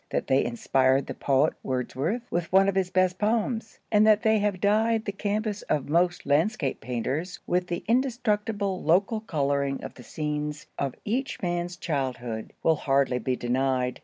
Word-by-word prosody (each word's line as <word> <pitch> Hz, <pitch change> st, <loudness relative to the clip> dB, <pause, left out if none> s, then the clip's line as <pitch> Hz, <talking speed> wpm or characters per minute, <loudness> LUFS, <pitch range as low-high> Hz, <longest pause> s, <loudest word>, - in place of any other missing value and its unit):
That -, -, -1 dB
they 135 Hz, +1 st, +3 dB
inspired 130 Hz, +3 st, +2 dB
the -, -, -5 dB
poet 140 Hz, +3 st, +2 dB
Wordsworth 135 Hz, -, -2 dB
with 175 Hz, -1 st, -2 dB
one 195 Hz, +1 st, +5 dB
of 195 Hz, -, +2 dB
his 190 Hz, -1 st, 0 dB
best 185 Hz, 0 st, +1 dB
poems, 220 Hz, +1 st, -1 dB
and 215 Hz, 0 st, +5 dB
that 215 Hz, +1 st, +5 dB
they 220 Hz, -1 st, +4 dB
have 205 Hz, -2 st, 0 dB
dyed 220 Hz, +3 st, +2 dB
the 200 Hz, -, -1 dB
canvas 210 Hz, +1 st, -2 dB
of 145 Hz, -2 st, 0 dB
most 175 Hz, +3 st, +1 dB
landscape 150 Hz, -, +1 dB
painters 130 Hz, -, -3 dB
with 180 Hz, 0 st, 0 dB
the 175 Hz, -1 st, -3 dB
indestructible 215 Hz, -5 st, 0 dB
local 195 Hz, +7 st, +2 dB
coloring 140 Hz, -7 st, -1 dB
of -, -, -7 dB
the 125 Hz, -, -13 dB
scenes 150 Hz, 0 st, -4 dB
of 135 Hz, -2 st, -2 dB
each 255 Hz, +6 st, -2 dB
man's 175 Hz, 0 st, -2 dB
childhood, 125 Hz, -9 st, -3 dB
will 160 Hz, -1 st, +3 dB
hardly 135 Hz, -3 st, +1 dB
be 125 Hz, +2 st, -1 dB
denied. 125 Hz, +1 st, 0 dB
175 Hz, 165 wpm, -26 LUFS, 135-210 Hz, -, one